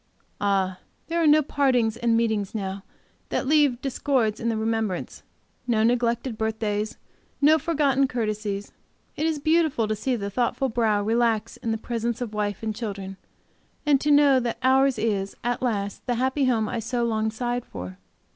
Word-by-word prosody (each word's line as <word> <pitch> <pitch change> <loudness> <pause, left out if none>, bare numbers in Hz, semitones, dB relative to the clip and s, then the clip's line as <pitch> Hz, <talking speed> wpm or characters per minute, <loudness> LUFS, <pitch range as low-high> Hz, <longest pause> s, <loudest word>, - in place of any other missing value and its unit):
Ah, 190 -2 +1 0.3
there 335 0 0
are 320 - +4
no 300 +1 +6
partings 255 -6 +1
and 230 -1 +1
meetings 220 -3 0
now 195 -1 -4 0.5
that - - -1
leave 290 -4 +3
discords 255 -5 0
in 230 - -1
the 225 - -1
remembrance, 220 -4 -2 0.5
no 220 -3 +2
neglected 235 0 0
birthdays, 215 -1 -2 0.4
no 310 +2 +5
forgotten 280 -5 +2
courtesies. 215 -4 -3 0.4
It 310 - 0
is 320 -2 0
beautiful 310 -6 +2
to 215 - -1
see 250 +4 -1
the 200 -3 -4
thoughtful 250 +4 0
brow 220 -3 +1
relax 225 0 +1
in 225 -1 -2
presence 235 0 -3
of 240 -4 -4
wife 205 -1 -2
and 220 -1 -2
children, 195 -4 -5 0.7
and 285 -2 +3
to 300 - 0
know 285 -2 +6
that 240 -2 -2
ours 265 +1 +4
is, 200 -3 -1
at 245 +1 -1
last, 205 -5 -2
the 245 - +1
happy 265 +3 +1
home 225 -4 +1
I 235 - -3
so 240 +2 -2
long 220 -1 0
sighed 240 +2 -2
for. 90 - -8
230 Hz, 165 wpm, -25 LUFS, 215-260 Hz, 0.7 s, no